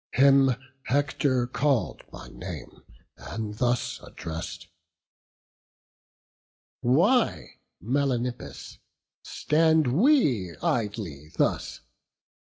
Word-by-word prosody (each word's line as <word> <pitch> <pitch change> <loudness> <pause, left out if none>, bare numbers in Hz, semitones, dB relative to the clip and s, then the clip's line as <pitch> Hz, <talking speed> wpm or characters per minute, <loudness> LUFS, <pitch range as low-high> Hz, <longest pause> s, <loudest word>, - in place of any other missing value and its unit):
Him 135 -1 +5 0.3
Hector 140 -2 +1
call'd 135 0 0
by - - -10
name, - - -9 0.4
and 105 - -6
thus 125 -1 0
address'd: 80 +1 -7 2.1
"Why, 180 - +2 0.2
Melanippus, 120 - -2 0.4
stand 160 0 +2
we 140 - +3
idly 100 - -3
thus? - - 0
125 Hz, 65 wpm, -26 LUFS, 105-145 Hz, 2.1 s, Him